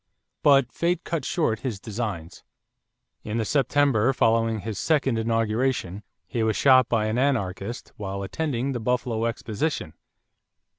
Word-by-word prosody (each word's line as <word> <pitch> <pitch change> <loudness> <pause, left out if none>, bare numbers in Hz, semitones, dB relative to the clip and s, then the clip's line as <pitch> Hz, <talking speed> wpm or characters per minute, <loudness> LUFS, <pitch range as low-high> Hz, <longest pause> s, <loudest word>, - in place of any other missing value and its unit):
But 140 -4 +4
fate 175 +4 -1
cut 165 -2 -3
short 115 - 0
his 120 -7 -4
designs. 105 -7 -5 0.8
In 110 +1 -3
the 115 - 0
September 135 -2 +2
following 115 -3 +2
his 110 -2 -5
second 135 -7 +1
inauguration, 115 -3 0 0.2
he 115 - -3
was 110 -1 +1
shot 130 -3 +5
by 110 -3 +1
an 110 +3 0
anarchist 115 -5 -1
while 100 -1 -4
attending 130 +5 -2
the 125 - -3
Buffalo 120 -1 -1
exposition. 115 - -2
115 Hz, 135 wpm, -25 LUFS, 110-135 Hz, 0.8 s, shot